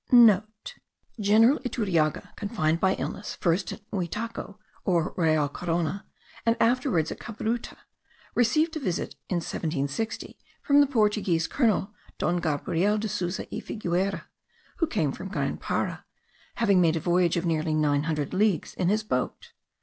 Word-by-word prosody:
(* - - -37 1.1
General 220 +7 +5
Iturriaga, 190 - -1
confined 170 -7 0
by 190 +1 +3
illness, 205 - -5
first 175 +2 0
at - - -8
Muitaco, 205 +3 -4 0.3
or 170 -5 +1
Real 155 -4 +2
Corona, 170 +5 -2 0.4
and 230 0 +2
afterward 230 - +2
at - - -6
Cabruta, 230 +1 -4 0.6
received 310 +8 +2
a - - -2
visit 185 - -2 0.2
in 185 - 0
1760 160 +3 -3 0.2
from 285 0 +5
the 285 - +4
Portuguese 210 -9 +2
colonel 215 - +1 0.2
Don 175 +3 +1
Gabriel 170 +5 0
de 215 +1 -2
Souza 185 -3 -3
y - - -3
Figueira, 190 -2 -2 0.5
who 330 - +1
came 160 - 0
from 190 - -7
Grand - - -2
Para, - - -2 0.5
having 200 -5 +3
made 165 -2 +3
a - - 0
voyage 175 +1 +2
of 170 - -1
nearly 155 -1 0
nine 145 -1 +2
hundred 150 -3 -2
leagues 195 -5 +1
in 180 - 0
his 215 +2 +1
boat. 125 -12 -3
185 Hz, 145 wpm, -27 LUFS, 165-220 Hz, 1.1 s, General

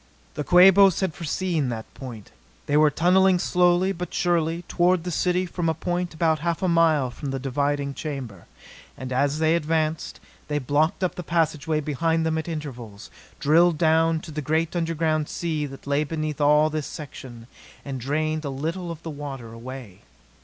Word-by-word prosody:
The 150 - -3
Quabos 190 +3 +6
had 190 -4 0
foreseen 165 -3 -2
that 110 -2 -6
point. 120 -6 -9 0.3
They 145 - 0
were 150 0 +6
tunneling 185 +4 +3
slowly 180 +1 +2
but 180 -1 -5
surely 170 -1 0
toward 175 0 +1
the 180 - -4
city 180 +2 +1
from 175 -1 -2
a 160 - 0
point 175 0 -3
about 160 -1 +1
half 170 +3 -2
a - - +2
mile 160 -6 +3
from 140 +3 -6
the 135 - -2
diving 140 +1 -1
chamber. 135 - -6 0.5
And 130 0 -5
as 140 +3 +1
they 160 +1 +3
advanced, 160 -1 -1 0.3
they 150 0 -1
blocked 150 +7 0
up 185 - 0
the - - -6
passageway 160 -2 0
behind 160 +3 0
them 160 0 0
at 160 - -6
intervals, 125 -10 -7 0.3
drilled 160 +3 +4
down 160 0 +3
to 165 - -10
the 150 0 -4
great 160 +4 -1
underground 160 -2 0
sea 155 -4 -2
that 135 0 -12
lay 140 +1 +1
beneath 155 -1 -4
all 150 +1 +4
this 155 -2 -3
section, 125 -5 -9 0.4
and 135 -3 -5
drained 155 +4 -1
a 140 - -3
little 165 +6 -4
of 165 -1 -7
the 165 - -5
water 135 -6 -7
away. 115 -4 -9
155 Hz, 175 wpm, -24 LUFS, 140-170 Hz, 0.5 s, Quabos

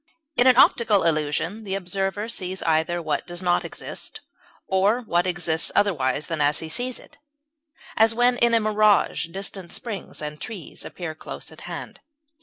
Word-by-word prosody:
In 245 - +5
an 255 -1 +6
optical 220 -6 +5
illusion 165 +6 0
the 195 -2 -2
observer 195 +2 -2
sees 190 -5 -4
either 160 +2 +1
what 155 -4 -2
does 175 +1 -5
not 175 -1 +2
exist, - - -6 0.4
or 200 +6 +2
what 175 -5 +1
exists 175 -2 0
otherwise 150 -9 +1
than 165 -3 -3
as 145 +1 +3
he 160 - -3
sees 245 +8 0
it, - - -15 0.8
as 225 0 +4
when 245 +1 +4
in 235 -1 +5
a - - +5
mirage 215 -4 +3
distant 190 0 -6
springs 215 -5 -5
and 150 0 -6
trees 205 -8 -7
appear 175 -3 -6
close 155 - -8
at - - -13
hand. - - -7
190 Hz, 165 wpm, -24 LUFS, 165-215 Hz, 0.8 s, an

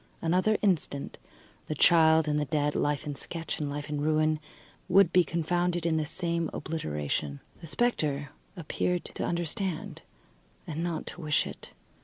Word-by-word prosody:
Another 185 +6 +2
instant, 165 -7 0 0.5
the 155 - -2
child 160 0 +5
and 150 0 +1
the 150 - 0
dead, 145 0 0
life 145 +1 0
in 145 - -3
sketch 165 +3 -5
and 150 -2 -2
life 145 0 -4
in 150 -1 -2
ruin, 155 0 +2 0.5
would 185 -1 +5
be 180 - +6
confounded 175 +2 0
in 160 -1 +2
the 155 - 0
same 170 0 -1
obliteration. 75 - -3 0.2
The 165 - -9
spectre 150 - 0 0.3
appeared 175 +2 -1
to - - -5
understand, 175 +1 -2 0.6
and 160 +1 -3
not 170 -2 -2
to 180 - -6
wish 150 -2 +2
it. - - -9
160 Hz, 155 wpm, -29 LUFS, 150-175 Hz, 0.6 s, be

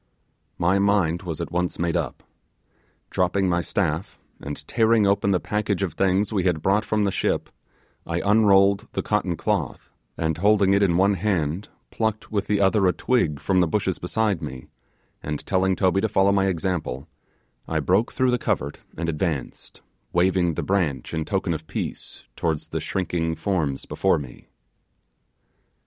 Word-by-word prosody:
My 90 +3 +2
mind 100 -4 +2
was 85 -5 -5
at - - -5
once 90 +1 -1
made 85 -1 -1
up. - - -3 0.9
Dropping 95 +1 +1
my 85 -1 +1
staff, 85 -3 -2 0.2
and 75 0 -7
tearing 115 -2 +3
open 100 0 +2
the 95 -2 +3
package 105 -1 -1
of 90 -6 -2
things 95 +4 +1
we 100 - +1
had 90 -4 0
brought 100 +3 +2
from 105 -1 0
the 100 - +1
ship, - - -1 0.5
I - - -2
unrolled 100 -2 +4
the - - -2
cotton - - 0
cloth, - - -2 0.3
and 80 0 -1
holding 100 0 +4
it 100 - +3
in 85 -4 +3
one 100 +2 +4
hand 95 -2 -1 0.2
picked 110 -1 -2
with 100 -2 -1
the 105 -1 +1
other 95 0 +3
a 90 - +3
twig 80 - 0
from 95 +4 +1
the 90 - +3
bushes 95 +1 -1
beside 100 0 0
me, 65 0 -7 0.5
and 75 -1 -5
telling 95 -1 +1
Toby 95 0 +2
to 110 - 0
follow 100 -1 +3
my 95 -1 +2
example, 85 -6 -2 0.6
I - - 0
broke 100 +6 +1
through 130 -1 +1
the 125 - +1
covert 70 +1 -2 0.2
and 85 +1 -2
advanced, 80 -4 -3 0.3
waving 90 -1 +2
the - - -2
branch 85 -11 -1
in 80 -1 -2
token 95 -4 -1
of 80 0 -6
peace - - -5
towards 80 -3 -2
the - - -2
shrinking 85 -3 -2
forms 80 -5 -1
before - - +1
me. 65 -5 -9
95 Hz, 165 wpm, -24 LUFS, 80-100 Hz, 0.9 s, unrolled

